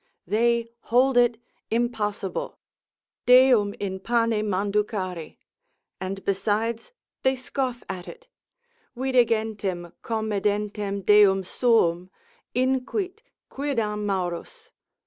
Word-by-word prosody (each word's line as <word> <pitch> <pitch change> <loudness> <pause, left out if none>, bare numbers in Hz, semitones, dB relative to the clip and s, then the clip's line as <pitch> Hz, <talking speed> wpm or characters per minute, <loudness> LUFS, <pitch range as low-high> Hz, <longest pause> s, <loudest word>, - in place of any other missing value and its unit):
They 235 +4 +2 0.2
hold 255 +3 +3
it 240 -1 +4 0.3
impossible, 215 -4 -2 0.7
Deum 250 -5 +6
in 190 -2 -3
pane 230 0 +1
manducari; 195 -4 -2 0.6
and 190 +1 -5
besides 215 - -1 0.3
they 265 0 +2
scoff 255 -1 -3
at 180 -1 -6
it, - - -11 0.7
vide 255 -1 +3
gentem 205 -6 -2
comedentem 210 -2 -2
Deum 200 -2 +6
suum, 185 -5 +2 0.5
inquit 265 - -1 0.3
quidam 230 -7 -2
Maurus. 195 - -4
220 Hz, 90 wpm, -25 LUFS, 195-245 Hz, 0.7 s, Deum